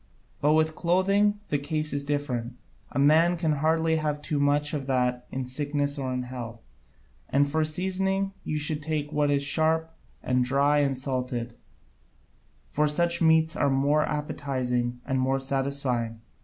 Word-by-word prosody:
But 150 +2 +4
with 155 0 +2
clothing 195 +4 +2
the 145 - +1
case 155 +2 -2
is 140 0 -1
different: 140 -5 -2 0.4
a - - -5
man 160 +5 +4
can 160 -2 0
hardly 160 +2 +1
have 150 -1 -1
too 145 0 -2
much 145 +1 +2
of 140 -3 -3
that 125 -2 0
in 130 -1 -3
sickness 145 +2 -1
or 130 -1 -2
in 125 0 -2
health. 120 -2 -8 0.7
And 145 +1 +3
for 155 +2 0
seasoning 190 +4 -1
you 155 - -2
should 150 0 0
take 150 -1 -2
what 150 -1 +2
is 140 -1 +2
sharp 160 +2 +1 0.3
and 125 0 +1
dry 140 +3 +3
and 140 -2 +1
salted, 125 -3 -3 1.1
for 150 +1 0
such 170 +3 +2
meats 160 0 +4
are - - +2
more 140 +3 +2
appetising 130 -5 -2
and 130 -1 0
more 130 +1 +1
satisfying. 135 -4 -2
145 Hz, 155 wpm, -26 LUFS, 130-155 Hz, 1.1 s, But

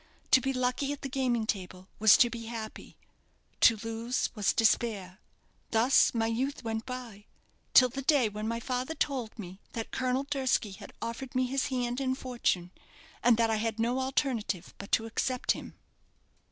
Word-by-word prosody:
To 260 - +7
be 270 - 0
lucky 255 +2 0
at 290 - -6
the 275 - -3
gaming 250 -4 0
table 185 -3 -4
was 220 0 +7
to 240 - +4
be 230 -1 -6
happy; 225 -2 -7 0.6
to 230 - +7
lose 225 +2 -2
was 210 -4 +1
despair. 215 -4 +1 0.5
Thus 235 +4 +4
my 225 -1 +1
youth 250 +6 -2
went 225 -1 -3
by, 240 -5 -7 0.5
till 255 -1 +8
the 275 +3 -5
day 275 -3 +3
when 210 +1 -5
my 230 +1 -2
father 255 +5 -3
told 255 -8 -2
me 190 -2 -9
that 225 -1 -5
Colonel 255 +1 0
Durski 265 -7 0
had 200 +1 -10
offered 235 +3 -5
me 255 0 +2
his 270 +1 -1
hand 250 -1 -2
and 260 -1 0
fortune, 235 -9 -1 0.5
and 240 -2 +5
that 230 -1 +2
I 220 - +1
had 225 0 -2
no 240 +3 +1
alternative 255 - -1
but 200 - -9
to 225 - +3
accept 250 +3 0
him." - - -5
235 Hz, 175 wpm, -30 LUFS, 220-255 Hz, 0.6 s, till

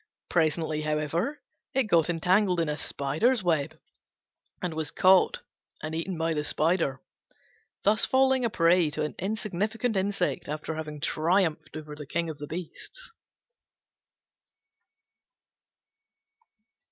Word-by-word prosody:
Presently, 160 -2 +1
however, 155 - -1 0.3
it 265 - +4
got 170 -7 +3
entangled 180 +2 +2
in 165 -2 +1
a 150 - -1
spider's 160 - 0
web, 160 -5 0 0.8
and 180 -2 -3
was 155 -2 -2
caught 190 - +4 0.4
and 155 +1 -4
eaten 165 +2 -3
by 165 0 0
the 150 -1 -1
spider, 155 -3 +1 0.8
thus 210 +2 +3
falling 265 -1 +3
a 235 - +2
prey 175 -3 +3
to 150 - -3
an 150 - -3
insignificant 215 +3 -1
insect 190 -1 0
after 155 +1 -3
having 155 -2 -6
triumphed 160 -1 0
over 150 -1 -8
the 150 -1 -9
King 170 +2 -1
of 150 - -11
the 145 - -6
Beasts. 180 - -7
165 Hz, 120 wpm, -28 LUFS, 155-200 Hz, 0.8 s, it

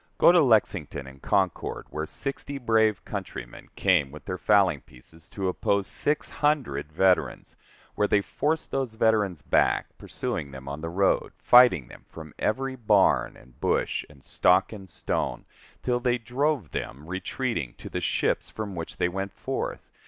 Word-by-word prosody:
Go - - +7
to 175 -1 +5
Lexington 100 - +1
and 65 0 -13
Concord, 95 -4 -1
where 80 0 -3
sixty 140 - -4
brave 110 -5 +2
countrymen - - -7
came 70 -2 +3
with 75 +2 -12
their 90 - -4
fowling 95 -9 +3
pieces 80 +6 -13
to 95 -2 -3
oppose 100 +2 0
six 150 +8 0
hundred 125 - -1
veterans 90 +3 +1 0.4
where 105 - +1
they 105 - +3
forced 155 +9 -2
those 130 -5 -2
veterans 105 -8 +1
back, - - +1
pursuing 70 - -3
them 65 0 -10
on 70 +2 -5
the 80 - -4
road, 95 +3 +1
fighting 120 - +5 0.2
from 80 -2 -10
every 130 +4 -1
barn, 105 - +3
and 65 -1 -20
bush, - - 0
and 70 -2 -18
stock, 95 +4 +2
and 95 -3 -10
stone, - - -3 0.4
till 125 -1 +1
they 125 0 +1
drove 125 - -1
them, 70 +5 -5
retreating, 95 - -3
to - - -10
the - - -4
ships - - 0
from 105 -3 -5
which 85 -2 -6
they - - +2
went 95 +2 -4
forth! - - -4
95 Hz, 160 wpm, -26 LUFS, 80-120 Hz, 0.4 s, Go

